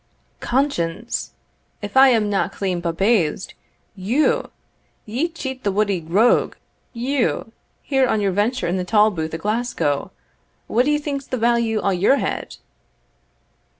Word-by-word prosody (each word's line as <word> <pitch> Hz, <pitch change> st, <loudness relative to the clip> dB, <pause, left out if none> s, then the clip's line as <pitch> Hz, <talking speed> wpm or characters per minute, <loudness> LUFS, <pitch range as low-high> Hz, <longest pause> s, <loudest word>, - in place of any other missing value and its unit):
"Conscience! 235 Hz, -, -1 dB, 0.5 s
if 205 Hz, +3 st, -6 dB
I 265 Hz, +1 st, +8 dB
am 225 Hz, -4 st, +2 dB
na 200 Hz, -1 st, +1 dB
clean 185 Hz, -3 st, -3 dB
bumbaized 175 Hz, 0 st, 0 dB, 0.4 s
you, 225 Hz, +11 st, +1 dB, 0.6 s
ye 245 Hz, +10 st, -1 dB
cheat 265 Hz, -6 st, -6 dB
the 200 Hz, -, +1 dB
wuddy 200 Hz, -2 st, 0 dB
rogue 195 Hz, +9 st, +2 dB, 0.4 s
you 245 Hz, -1 st, -1 dB, 0.3 s
here 270 Hz, -2 st, +2 dB
on 220 Hz, -, +1 dB
your 200 Hz, -2 st, +1 dB
venture 215 Hz, +7 st, 0 dB
in 175 Hz, +2 st, 0 dB
the 180 Hz, -, -1 dB
tolbooth 180 Hz, -6 st, +1 dB
o' -, -, -2 dB
Glasgow? 210 Hz, -, -1 dB, 0.6 s
What 245 Hz, +3 st, +1 dB
d'ye 295 Hz, +1 st, +2 dB
think's 285 Hz, -2 st, -4 dB
the 255 Hz, -, -2 dB
value 230 Hz, -1 st, +1 dB
o' 200 Hz, -, +1 dB
your 190 Hz, +8 st, +3 dB
head?" -, -, -4 dB
220 Hz, 135 wpm, -21 LUFS, 190-255 Hz, 0.6 s, I